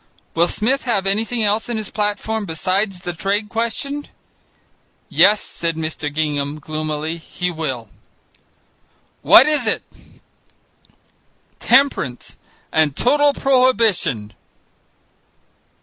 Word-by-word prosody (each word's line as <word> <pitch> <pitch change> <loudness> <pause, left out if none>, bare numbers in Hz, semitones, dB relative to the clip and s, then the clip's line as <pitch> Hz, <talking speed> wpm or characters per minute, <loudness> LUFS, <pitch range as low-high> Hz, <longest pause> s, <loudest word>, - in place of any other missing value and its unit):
"Will 170 +1 +3
Smith 255 +9 -1
have 205 -6 0
anything 220 +4 0
else 210 +3 0
in 235 - -2
his 215 -3 -5
platform 210 +1 -2
besides 185 +4 -1
the 175 -1 -4
trade 200 +5 -2
question?" 235 +6 -3 1.0
"Yes," 205 0 +5
said 165 -1 -4
Mr. 155 -2 -4
Gingham 145 -1 -2
gloomily, 155 +1 -4
"he 180 +2 -4
will." 135 -8 -5 1.3
"What - - +8
is 295 -6 +2
it?" - - 0 1.8
"Temperance 265 - +1 0.4
and 155 -3 +2
total 290 - +3
prohibition!" 225 - +1
195 Hz, 100 wpm, -19 LUFS, 155-225 Hz, 1.8 s, What